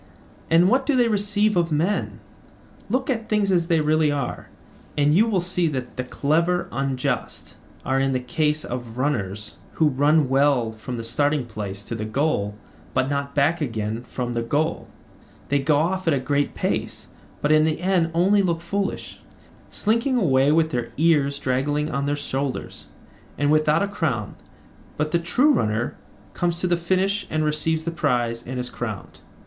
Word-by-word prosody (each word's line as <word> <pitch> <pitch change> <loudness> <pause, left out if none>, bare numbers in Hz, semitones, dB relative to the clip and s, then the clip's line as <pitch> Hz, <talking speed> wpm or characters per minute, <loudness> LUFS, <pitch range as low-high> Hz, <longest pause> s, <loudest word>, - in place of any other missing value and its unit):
And 170 +2 +5
what 260 +6 +2
do 290 - +3
they 245 -2 +4
receive 205 0 +2
of 170 -2 +1
men? 170 +7 -1 0.7
Look 260 +4 0
at 230 -4 -2
things 210 -2 +2
as 170 -2 +2
they 165 -3 +3
really 155 0 +2
are, 140 -4 -4 0.5
and 145 0 +3
you 215 +7 +4
will 205 -5 +1
see 180 -1 0
that 130 -5 -4
the 125 - -2
clever 165 +7 0
unjust 135 -2 -3 0.3
are 135 0 +1
in 135 0 +1
the 130 - 0
case 150 +5 -1
of 120 -2 -6
runners, 105 -7 -2 0.2
who 155 -2 +3
run 145 +2 +3
well 135 -3 +2
from 110 +3 -7
the 115 - -5
starting 145 +4 0
place 100 -3 -6
to - - -6
the 110 -1 -3
goal 110 -3 -1 0.4
but 130 +2 +1
not 140 0 -2
back 150 +4 +2
again 110 -3 -3
from 120 -1 -3
the 120 - -1
goal: 150 +8 -1 0.6
they 140 - +2
go 145 +2 +2
off 180 +4 0
at 160 - +4
a - - 0
great 140 +2 -1
pace, - - -3 0.3
but 145 - +1
in 155 0 +5
the 155 0 0
end 180 -2 +1
only 195 +4 +4
look 170 -3 0
foolish, 195 +4 -3 0.5
slinking 235 +5 0
away 140 - +3
with 160 0 +2
their 120 -2 -3
ears 145 -3 +3
draggling 145 +4 -1
on 140 -1 -1
their 145 - +1
shoulders, 140 -2 -4 0.5
and 145 0 +2
without 155 +3 +3
a - - 0
crown; 140 - -2 0.6
but 150 +1 -1
the 170 - +2
true 250 - +3
runner 110 - 0 0.4
comes 170 -1 -1
to 185 - -2
the 175 -1 +2
finish 190 +4 0
and 155 0 0
receives 155 +1 0
the 170 - -2
prize 120 -7 0
and 130 0 -4
is 125 0 -4
crowned. - - -6
150 Hz, 175 wpm, -23 LUFS, 130-170 Hz, 0.7 s, And